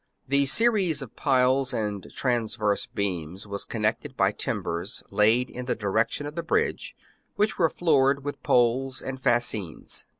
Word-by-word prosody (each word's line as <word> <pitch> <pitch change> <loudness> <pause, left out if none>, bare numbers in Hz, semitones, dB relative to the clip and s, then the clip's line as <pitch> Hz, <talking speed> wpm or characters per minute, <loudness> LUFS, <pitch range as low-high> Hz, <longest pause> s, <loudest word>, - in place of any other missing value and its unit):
The 140 +1 +3
series 190 - +3
of 125 - -12
piles 130 -1 +2
and 105 -4 -4
transverse 110 -5 0
beams 95 -2 -4
was 100 -1 -1
con 110 -2 -5
nected 130 +6 -1
by 95 0 +3
timbers 85 -5 -2
laid 115 +4 +3
in 125 0 -6
the 125 - -1
direction 110 +7 -1
of 145 - -6
the 170 - -3
bridge, 440 - -1 0.4
which 210 -1 0
were 165 -2 +4
floored 140 -5 +2
with 145 - -5
poles 125 +2 +2
and 130 0 -6
fascines. 110 -9 -1
125 Hz, 155 wpm, -26 LUFS, 105-140 Hz, 0.4 s, were